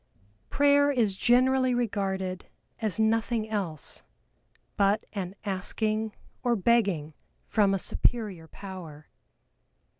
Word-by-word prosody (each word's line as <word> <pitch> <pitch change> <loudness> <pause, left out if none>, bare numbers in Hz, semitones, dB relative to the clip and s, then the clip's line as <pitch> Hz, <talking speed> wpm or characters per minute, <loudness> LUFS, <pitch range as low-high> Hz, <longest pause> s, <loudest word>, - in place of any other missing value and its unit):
Prayer 285 0 +4
is 225 -8 +1
generally 255 +3 +3
regarded 195 -5 -2 0.3
as 220 -1 -1
nothing 225 0 +1
else 190 -9 -3 0.7
but 200 +1 +2
an 190 -2 -4
asking 215 +3 -1 0.3
or 240 -1 +2
begging 195 -8 +1 0.3
from 205 -3 +2
a 195 - +2
superior 195 -4 -1
power. 170 -6 -10
210 Hz, 95 wpm, -28 LUFS, 190-235 Hz, 0.7 s, Prayer